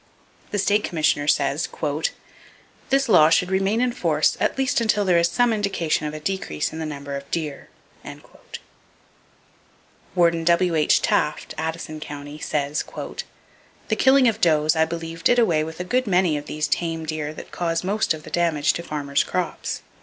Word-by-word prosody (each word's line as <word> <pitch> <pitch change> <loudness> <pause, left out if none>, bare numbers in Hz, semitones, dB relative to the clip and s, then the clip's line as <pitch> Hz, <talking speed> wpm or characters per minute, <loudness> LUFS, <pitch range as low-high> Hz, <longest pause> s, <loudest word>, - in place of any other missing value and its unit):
The 205 - -2
State 205 +1 +2
Commissioner 155 -3 0
says: 145 +1 +1 1.2
"This 275 0 +2
law 170 -8 +6
should 180 +3 +2
remain 195 +4 +1
in 250 -1 +2
force 160 -9 +1
at - - 0
least 265 -3 +1
until 210 -2 +2
there 180 -2 +4
is 170 0 +2
some 235 +6 +2
indication 190 -7 -1
of 150 - -5
a - - -5
decrease 155 - -3
in 160 - -6
the 160 - -3
number 140 -1 -6
of 140 0 -7
deer." 155 -4 -4 2.5
Warden 170 -2 +3
W.H. 170 -2 +3
Taft 150 0 0
(Addison 160 -1 -4
County) 145 0 -8
says: 150 0 -1 1.1
"The - - +2
killing 265 -1 +5
of 225 -1 0
does 155 -1 +3
I 160 0 +3
believe 165 0 -6
did 245 - +4
away 170 -10 +3
with 160 +1 -7
a - - -2
good 250 +6 0
many 180 -4 +2
of 145 - -5
these 155 0 -2
tame 165 0 -2
deer 155 -1 -3
that - - -10
cause 165 -1 -1
most 200 -3 0
of 155 - -12
the - - -11
damage 160 -4 +1
to - - -4
farmers' 145 -4 -1
crops." 180 -2 -3
165 Hz, 170 wpm, -23 LUFS, 155-190 Hz, 2.5 s, law